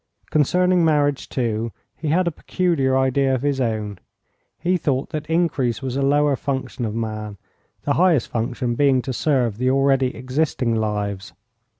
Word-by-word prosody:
Concerning 180 +4 +3
marriage, 145 -3 +1
too, 115 -2 -1 0.2
he 160 - -5
had 175 +5 +2
a - - +1
peculiar 150 -6 0
idea 130 0 +2
of 130 - -4
his 140 -2 0
own; 105 -5 -2 0.6
he 180 +3 +1
thought 140 -6 -1
that 150 0 -4
increase 145 -8 0
was 130 -1 -3
a 140 - 0
lower 145 +1 +3
function 130 -2 -3
of 110 0 -3
man, 110 -2 -4 0.5
the 145 - +1
highest 170 -5 +3
function 120 +1 -2
being 130 0 +3
to 130 - -3
serve 120 -5 0
the 130 0 +2
already 135 -1 +2
existing 130 -2 -1
lives. 105 -3 -2
130 Hz, 160 wpm, -22 LUFS, 115-145 Hz, 0.6 s, Concerning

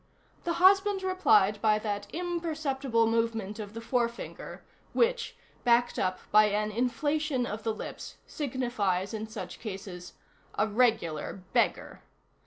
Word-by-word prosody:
The 340 - +1
husband 390 +2 +4
replied 210 - +3
by 215 -1 +4
that 205 -1 -3
imperceptible 310 -8 -1
movement 225 -2 -1
of 210 0 -7
the 230 - -5
forefinger, 235 0 -3 0.3
which, 485 0 +1 0.3
backed 240 0 +3
up 185 0 0
by 215 +1 +7
an 210 +1 0
inflation 255 +4 0
of 215 -1 -5
the 225 - -1
lips, - - -7
signifies 235 - -1
in 220 0 -4
such 205 -5 -7
cases: 190 -4 -7 0.4
A 210 - +2
regular 210 -7 0
beggar. - - 0
230 Hz, 125 wpm, -29 LUFS, 210-285 Hz, 0.4 s, by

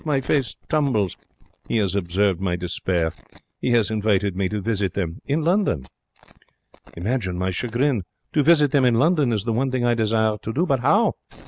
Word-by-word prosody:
My 150 -3 +1
face 135 -3 0
tumbles. 130 - +1 0.5
He - - 0
has 100 -4 +1
observed 95 0 0
my 90 -2 0
despair. 90 -1 -1 0.5
He - - -1
has 115 -3 +2
invited 105 -3 +1
me 95 -1 0
to 105 - -2
visit 100 -3 -1
them 85 -4 -3
in 150 +3 0
London. 170 - +1 1.1
Imagine 95 -1 -2
my 95 +1 -1
chagrin. 120 +4 0 0.3
To 150 - +3
visit 150 -2 +4
them 140 -3 +3
in 125 -2 +4
London 150 0 +3
is 105 -4 0
the 115 0 -1
one 130 +4 0
thing 130 -1 -1
I 120 - +3
desire 110 -1 +1
to 110 - -4
do. 165 +8 +1
But 135 -7 +1
how? 200 - +2
110 Hz, 185 wpm, -22 LUFS, 95-135 Hz, 1.1 s, visit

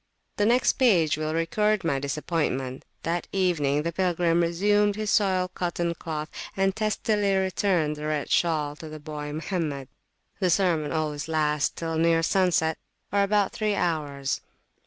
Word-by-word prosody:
The 205 - +3
next 245 +4 +3
page 175 - +4
will 155 +1 -2
record 210 +5 +1
my 140 -5 0
disappointmentthat 150 +2 -3
evening 150 -7 +1
the 170 - -1
pilgrim 175 -1 +1
resumed 205 +4 +2
his 215 -1 -2
soiled 185 -3 +2
cotton 175 -1 -1
cloth, 155 -2 -5 0.3
and 195 0 +2
testily 210 -2 +1
returned 185 -5 +1
the 150 0 -4
red 150 -2 -2
shawl 155 -4 +1
to 160 - -9
the 155 0 -8
boy 150 -1 -6
Mohammed. 150 -4 -3 0.5
The 185 -3 +2
sermon 170 -4 +2
always 155 -2 -2
lasts 150 -2 +1
till 165 -1 -3
near 165 0 +3
sunset, 170 -3 +2 0.3
or 200 +1 +3
about 200 0 +2
three 215 -2 0
hours. 145 -6 -1
165 Hz, 145 wpm, -26 LUFS, 150-195 Hz, 0.5 s, page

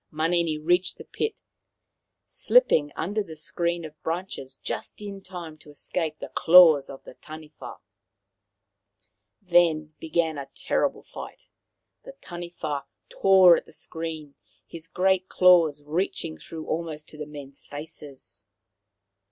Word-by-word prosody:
Manini 165 0 0
reached 175 +4 +1
the - - -10
pit, 440 -1 -4 0.9
slipping 160 - +3
under 205 +4 -1
the 165 -6 -8
screen 170 +2 -2
of 155 0 -12
branches 160 -6 -5
just - - -6
in 200 -2 -7
time 175 -5 -8
to 150 - -17
escape 155 +1 -4
the - - -8
claws 160 -5 +7
of 135 - -10
the - - -12
Taniwha. 155 +2 -11 1.7
Then 165 -4 +3
began 160 -1 -1
a 135 -1 -8
terrible - - -1
fight. - - -11 0.5
The - - -10
Taniwha 170 - -6 0.2
tore 190 -3 +6
at - - -7
the - - -16
screen, 160 -3 -6 0.3
his 165 -1 -11
great 190 +1 +1
claws 170 -5 +5
reaching 150 - -3
through 160 - -8
almost 160 -2 -4
to 155 - -13
the 150 - -5
men's 140 -2 -9
faces. 145 -2 -11
160 Hz, 125 wpm, -26 LUFS, 150-180 Hz, 1.7 s, claws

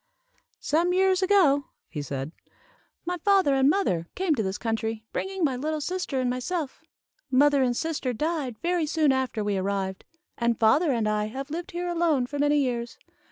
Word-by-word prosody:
"Some 340 +4 +1
years 380 0 +3
ago," 350 -8 +4 0.2
he 150 - -5
said, 140 +1 -5 0.7
"my 355 +1 -2
father 385 -5 +3
and 270 0 +4
mother 185 - +1
came 370 -4 +1
to 245 - 0
this 190 -1 -2
country, 225 0 -3
bringing 385 -1 -3
my 275 -4 +2
little 305 +4 -2
sister 350 -3 -2
and 255 - 0
myself. 265 +5 -3 0.5
"Mother 280 +2 +4
and 245 -2 +1
sister 315 -5 -2
died 285 -2 -2
very 345 -2 +1
soon 305 -2 +2
after 260 -5 -1
we 205 -1 0
arrived, 190 0 -2 0.4
and 235 -1 +1
father 275 +8 +4
and 230 -4 0
I 210 0 0
have 270 +6 -6
lived 345 +4 -4
here 355 -2 -4
alone 335 -7 +1
for 285 +3 -6
many 290 +1 +3
years. 240 -4 -1
275 Hz, 175 wpm, -26 LUFS, 230-335 Hz, 0.7 s, ago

